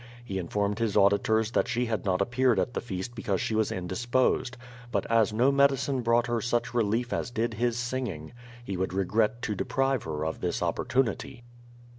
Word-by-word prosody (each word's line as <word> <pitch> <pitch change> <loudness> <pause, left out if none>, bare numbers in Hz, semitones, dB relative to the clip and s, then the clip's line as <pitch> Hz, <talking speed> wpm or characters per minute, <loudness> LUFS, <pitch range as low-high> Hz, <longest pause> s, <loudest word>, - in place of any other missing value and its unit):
He 95 -4 -3
informed 100 +4 -1
his 110 -3 0
auditors 105 +2 +3
that - - +1
she 125 0 0
had 110 -2 -2
not 95 -1 +1
appenred 120 +3 +2
at 125 - 0
the - - -2
feast 100 +1 -5
because 100 -5 -2
she - - -2
was 110 0 +1
indisposed. 120 +7 0 0.3
But 100 -5 0
as 115 -2 +4
no 120 +6 +3
medidnc 140 -2 +2
brought 115 0 +3
her 120 -2 -1
such 120 +2 -1
relief 120 +1 0
as - - -2
did 115 -1 -1
his 120 +1 0
singing, 120 -10 -4 0.3
he 100 - -3
would 95 0 -2
regret 105 +5 +1
to 105 - -1
deprive 135 +4 0
her 75 -1 -3
of 80 - -4
this 90 0 -1
opportunity. 120 +6 -1
115 Hz, 185 wpm, -28 LUFS, 100-120 Hz, 0.3 s, as